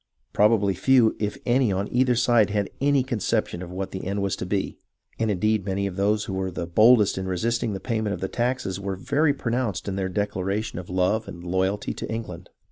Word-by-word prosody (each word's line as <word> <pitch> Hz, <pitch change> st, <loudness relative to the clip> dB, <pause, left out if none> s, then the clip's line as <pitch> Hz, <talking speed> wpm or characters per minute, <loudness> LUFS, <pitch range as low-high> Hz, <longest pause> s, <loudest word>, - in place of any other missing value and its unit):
Probably 105 Hz, -2 st, +3 dB
few, 115 Hz, +4 st, +4 dB
if 105 Hz, -1 st, -2 dB
any, 125 Hz, -2 st, +3 dB
on 95 Hz, +2 st, -1 dB
either 125 Hz, 0 st, +3 dB
side 115 Hz, -3 st, +3 dB
had 100 Hz, -1 st, -1 dB
any 140 Hz, -1 st, +3 dB
conception 115 Hz, -7 st, -1 dB
of 90 Hz, -, -7 dB
what 95 Hz, +1 st, -5 dB
the 95 Hz, -, -6 dB
end 100 Hz, +1 st, -2 dB
was 100 Hz, -, 0 dB
to 90 Hz, -, -5 dB
be, 95 Hz, 0 st, -2 dB, 0.4 s
and 110 Hz, -1 st, +1 dB
indeed 105 Hz, +1 st, +1 dB
many 100 Hz, +1 st, -1 dB
of 95 Hz, -2 st, -4 dB
those 105 Hz, +2 st, +1 dB
who 100 Hz, -, -5 dB
were 95 Hz, 0 st, -2 dB
the 85 Hz, -1 st, -4 dB
boldest 105 Hz, +3 st, +4 dB
in 95 Hz, -, -4 dB
resisting 115 Hz, +4 st, -1 dB
the 95 Hz, -, -4 dB
payment 110 Hz, -3 st, -2 dB
of -, -, -9 dB
the 95 Hz, -, -2 dB
taxes 120 Hz, -6 st, -2 dB
were 100 Hz, -1 st, -3 dB
very 140 Hz, +8 st, +1 dB
pronounced 115 Hz, -8 st, -2 dB
in 95 Hz, -1 st, -2 dB
their 95 Hz, -1 st, -1 dB
declaration 100 Hz, +1 st, -2 dB
of 90 Hz, -, -9 dB
love 95 Hz, +5 st, +1 dB
and 85 Hz, -, -9 dB
loyalty 95 Hz, +3 st, -1 dB
to -, -, -6 dB
England. 95 Hz, -6 st, -6 dB
100 Hz, 210 wpm, -25 LUFS, 95-115 Hz, 0.4 s, few